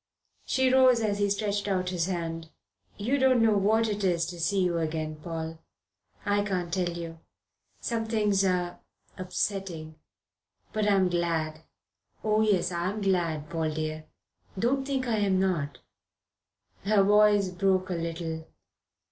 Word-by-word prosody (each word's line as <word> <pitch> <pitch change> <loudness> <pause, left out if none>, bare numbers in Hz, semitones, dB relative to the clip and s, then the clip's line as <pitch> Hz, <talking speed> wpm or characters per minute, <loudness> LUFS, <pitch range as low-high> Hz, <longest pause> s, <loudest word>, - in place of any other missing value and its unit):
She 260 -1 +2
rose 255 -2 +6
as 205 -2 0
he 205 0 +2
stretched 205 0 -1
out 185 -2 0
his 175 -1 0
hand. 165 -3 -4 0.5
"You 245 +7 0
don't 260 -2 +4
know 225 -2 +4
what 220 +3 +3
it 205 -1 -2
is 170 -3 +2
to 175 - -9
see 185 +3 +1
you 175 -2 +1
again, 155 -1 -3
Paul. 160 0 -5 0.7
I 205 0 +2
can't 180 -4 -2
tell 180 -2 +1
you. 165 -1 -7 0.6
Some 230 -2 -1
things 210 -3 +1
are 180 -2 0 0.4
upsetting. 180 -4 -3 0.7
But 215 -2 +1
I'm 195 -2 +4
glad. 165 -3 -1 0.6
Oh, 215 0 +2
yes, 195 -5 +2
I'm 180 +4 -2
glad, 170 -6 0
Paul 160 -1 -1
dear. 155 0 -3 0.5
Don't 265 +6 +1
think 265 -2 -1
I'm 205 -5 +2
not." 155 -8 0 1.1
Her 200 0 +4
voice 205 -1 +5
broke 185 0 +1
a - - +1
little. 165 -1 -4
185 Hz, 140 wpm, -28 LUFS, 165-210 Hz, 1.1 s, rose